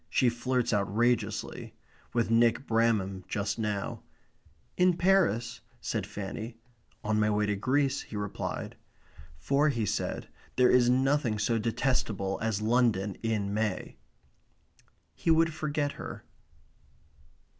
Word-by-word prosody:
She 125 - +3
flirts 120 0 -1
outrageously 110 +4 0 0.4
with 115 -2 0
Nick 115 +3 +3
Bramham 110 -5 +1
just 100 +3 -2
now. 105 -2 -2 0.7
"In 180 -1 +3
Paris?" 130 - +2 0.2
said 105 -5 -3
Fanny. 105 +3 -6 0.5
"On 110 0 +1
my 105 0 +3
way 105 0 +1
to 105 0 0
Greece," 135 +6 +1
he - - -10
replied. 105 -1 -4 0.6
For, 140 - +2
he 115 -6 0
said, - - -2 0.3
there 125 -1 +5
is 125 -1 +5
nothing 130 -2 +2
so 115 +2 +1
detestable 110 -4 -1
as 110 -2 -1
London 110 -4 +2
in 105 -3 -1
May. 105 -3 -2 1.2
He - - -3
would 165 0 +4
forget 150 -2 -1
her. - - -8
115 Hz, 120 wpm, -29 LUFS, 105-130 Hz, 1.2 s, there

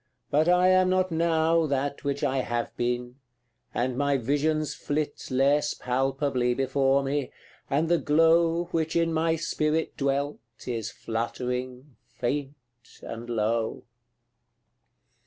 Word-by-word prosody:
but 155 +4 +3
I 180 +1 +5
am 185 0 +4
not 185 0 +1
now 165 0 +2
That 140 0 -2
which 140 0 -2
I 135 0 +1
have 120 -2 -2
been 125 +1 -2 0.5
and 125 +1 -1
my 140 +1 +1
visions 145 +4 0
flit 145 0 -3
Less 140 +3 +2
palpably 130 -1 0
before 135 +1 +2
me 140 -1 -2 0.4
and 150 +4 +1
the 170 0 +3
glow 165 +2 +3
Which 160 -1 -1
in 165 -1 +2
my 160 +1 +2
spirit 155 -1 -1
dwelt 140 +1 -1 0.3
is 115 -4 -3
fluttering, 125 +4 -4 0.2
faint, 140 +3 -2 0.5
and 115 +1 -7
low. 115 0 -1
140 Hz, 120 wpm, -27 LUFS, 125-160 Hz, 0.5 s, I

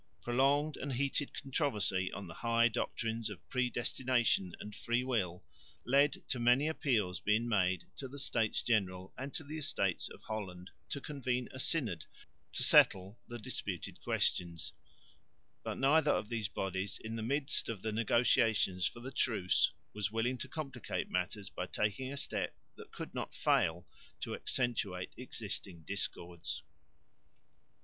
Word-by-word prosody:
Prolonged 140 +5 +3
and 140 -1 -3
heated 140 +2 0
controversy 105 - 0
on 100 - -5
the 85 - -8
high 115 +5 +3
doctrines 115 0 -2
of 100 - -9
Predestination 120 -5 +1
and 105 - -7
Freewill 120 -8 0 0.4
led 140 +4 +4
to 130 - 0
many 125 +5 +4
appeals 110 - +1
being 110 +5 +2
made 95 -5 +2
to 135 - -4
the 140 +2 -9
States 115 -5 +1
General 95 -5 0
and 135 +2 -5
to - - -1
the 155 +2 -5
Estates 100 - 0
of - - -12
Holland 95 -4 -5 0.2
to 140 - -3
convene 125 -4 -2
a 130 - -8
Synod 120 - +1 0.5
to - - +2
settle 95 +3 +6
the 120 - -6
disputed 110 - -5
questions, 85 -2 0 0.9
but - - -4
neither 150 +3 +4
of 105 - +1
these 115 -4 -1
bodies 95 0 -2
in 110 +1 -4
the 115 - -3
midst 140 +5 +1
of 105 -5 -4
the 110 - 0
negotiations 110 -4 +3
for 120 - -7
the 130 +2 -6
truce 105 -8 +3 0.2
was 105 0 -1
willing 120 +3 0
to - - -3
complicate 130 - -4
matters 95 +2 -2
by 90 - -4
taking 105 +8 -1
a 140 - -4
step - - -1 0.2
that - - -12
could - - -7
not - - -4
fail 85 +2 +2 0.4
to - - -3
accentuate 105 -8 -1
existing 100 -8 -5
discords. 90 -2 -3
115 Hz, 145 wpm, -34 LUFS, 95-130 Hz, 0.9 s, settle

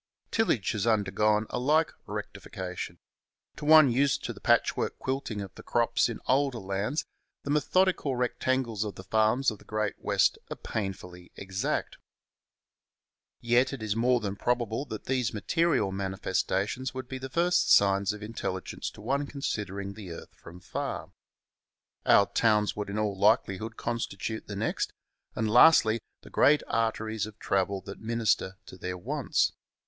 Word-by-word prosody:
Tillage 180 - +1
has 105 0 -1
undergone 105 0 +2
a - - -1
like 155 +5 +3 0.2
rectification. 90 -2 -6 0.6
To 150 - -6
one 155 -3 +8
used 135 +3 +2
to - - -3
the - - -14
patchwork - - +2
quilting 130 -5 -3
of 95 -1 -8
the - - -11
crops 115 -2 +1
in 115 - -5
older 135 -1 +2
lands 100 +9 -2 0.4
the 140 - -3
methodical 150 -1 +2
rectangles 125 -2 0
of 105 -2 -5
the 95 - -9
farms 110 +6 +2
of 105 - -9
the - - -16
Great 110 -1 -2
West - - +2
are - - -4
painfully 90 -4 -6
exact. 95 0 -3 1.4
Yet 120 +3 +3
it 130 -5 -6
is 105 -1 -1
more 125 +2 +3
than 100 -3 -3
probable 120 +3 -1
that 110 -6 -7
these 125 -4 0
material 130 - +1
manifestations 95 +5 -2
would 130 -1 -5
be 130 0 -6
the 135 +1 -6
first 175 +5 +2
signs 100 0 +5
of 105 0 -8
intelligence 100 -4 -4
to - - -13
one 140 +6 -1
considering 100 -8 -4
the 100 -3 -9
earth - - -11
from 90 +1 -13
far. - - -4 1.0
Our 100 - +7
towns 105 +1 +2
would 105 -1 -4
in 100 - -3
all 105 -2 0
likelihood 110 +1 +1
constitute 110 -1 -4
the 105 - -5
next; 105 - -1 0.4
and, 110 - 0
lastly, 115 -1 +6 0.2
the - - -14
great 150 +1 +4
arteries 110 -1 -1
of 110 - -12
travel 95 0 0
that 100 +1 -9
min 115 +1 -3
ister 100 -3 +1
to 95 - -11
their 90 +1 -4
wants. 90 - 0
110 Hz, 155 wpm, -28 LUFS, 100-125 Hz, 1.4 s, one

